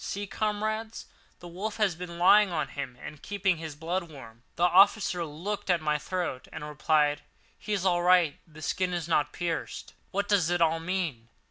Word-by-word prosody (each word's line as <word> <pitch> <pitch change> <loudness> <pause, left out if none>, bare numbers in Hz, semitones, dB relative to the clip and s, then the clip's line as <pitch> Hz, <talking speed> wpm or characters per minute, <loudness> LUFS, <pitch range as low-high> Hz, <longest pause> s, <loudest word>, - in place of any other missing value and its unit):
See, 205 +1 -4
comrades, 215 +2 -2 0.4
the 175 - -9
wolf 195 +5 -5
has 210 -4 +2
been 170 0 -8
lying 195 +3 +6
on 155 -3 -1
him 135 -4 -6
and 150 - -9
keeping 195 -3 0
his 160 -2 -7
blood 170 +4 -2
warm." 115 -6 -12
The 170 - -1
officer 185 0 +4
looked 170 +7 -5
at 175 -2 +4
my 150 -1 0
throat 170 -4 -3
and 150 - -6
replied: 150 0 +1 0.4
"He 210 - -4
is 195 -2 -1
all 175 -2 +3
right; 175 -4 +4
the 155 -1 -12
skin 180 +5 -1
is 170 -2 -3
not 150 -3 +1
pierced. 170 -2 -4 0.2
What 200 +1 -1
does 195 -6 +2
it 175 0 +1
all 165 -1 +3
mean? 165 -10 -3
175 Hz, 190 wpm, -28 LUFS, 155-190 Hz, 0.4 s, lying